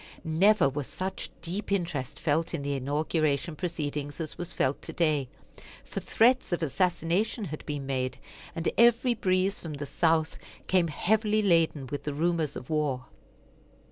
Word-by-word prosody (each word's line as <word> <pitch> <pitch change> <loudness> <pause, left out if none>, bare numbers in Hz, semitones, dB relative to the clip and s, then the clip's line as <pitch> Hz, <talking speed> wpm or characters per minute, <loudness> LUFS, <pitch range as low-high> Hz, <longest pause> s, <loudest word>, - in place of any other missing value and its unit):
Never 185 +3 +4
was 140 0 -3
such 190 +1 -4
deep 190 +5 -4
interest 170 -9 -2
felt 160 +1 0
in 140 - -4
the 140 0 -1
inauguration 150 +3 0
proceedings 150 -4 -3
as 155 -2 -4
was 175 +1 -5
felt 135 -3 0
today; 150 -6 0 0.6
for - - -4
threats 250 +1 +3
of 175 -1 0
assassination 180 - 0
had 155 -3 -6
been 145 -2 -3
made, 130 -1 -2 0.4
and 165 +1 -2
every 235 +1 +5
breeze 190 -2 +1
from 160 -3 -6
the 145 0 -5
South 160 +2 +1 0.3
came 180 -2 +3
heavily 215 +6 +1
laden 165 -6 +3
with 145 +2 -5
the 145 -1 -2
rumors 160 -2 0
of 125 - -7
war. 145 -5 -1
160 Hz, 150 wpm, -28 LUFS, 145-185 Hz, 0.6 s, every